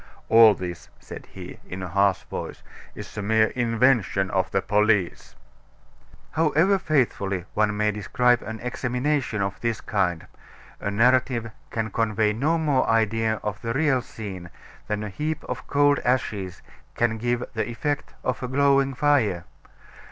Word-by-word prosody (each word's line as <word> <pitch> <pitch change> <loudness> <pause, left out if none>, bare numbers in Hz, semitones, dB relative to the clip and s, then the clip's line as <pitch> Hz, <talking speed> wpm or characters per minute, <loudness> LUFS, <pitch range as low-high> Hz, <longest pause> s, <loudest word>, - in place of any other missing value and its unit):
"All 110 -2 +7
this," 90 -2 -7
said - - -10
he, - - -10
in 95 0 -5
a - - -4
harsh 100 +1 +2
voice, - - -7 0.3
"is - - -9
a - - -2
mere 110 +1 +3
invention 115 -5 +1
of 95 -1 0
the 95 - +1
police!" 105 -2 +1 1.0
However 165 +5 +2
faithfully 100 - 0
one 105 -1 +1
may 105 0 +2
describe 120 +4 +1
an 110 0 -7
examination 125 -2 -1
of 100 0 -4
this 115 -2 -1
kind, 90 -5 -1 0.5
a - - -3
narrative 120 +1 +2 0.2
can 110 -2 -3
convey 105 -1 +1
no 150 +9 +1
more 145 -5 +1
idea 115 0 +2
of 105 -1 -4
the 115 0 -2
real 135 -2 +2
scene 95 -7 -8 0.4
than 105 0 -2
a 105 - -4
heap 150 +9 -3
of - - -6
cold 145 0 +3
ashes 105 -7 -1 0.3
can 115 -1 0
give 120 +1 -1
the 110 +1 -2
effect 145 +5 -3
of 130 -1 -2
a 125 - -3
glowing 135 0 +2
fire. 125 - +2
115 Hz, 150 wpm, -24 LUFS, 105-130 Hz, 1.0 s, All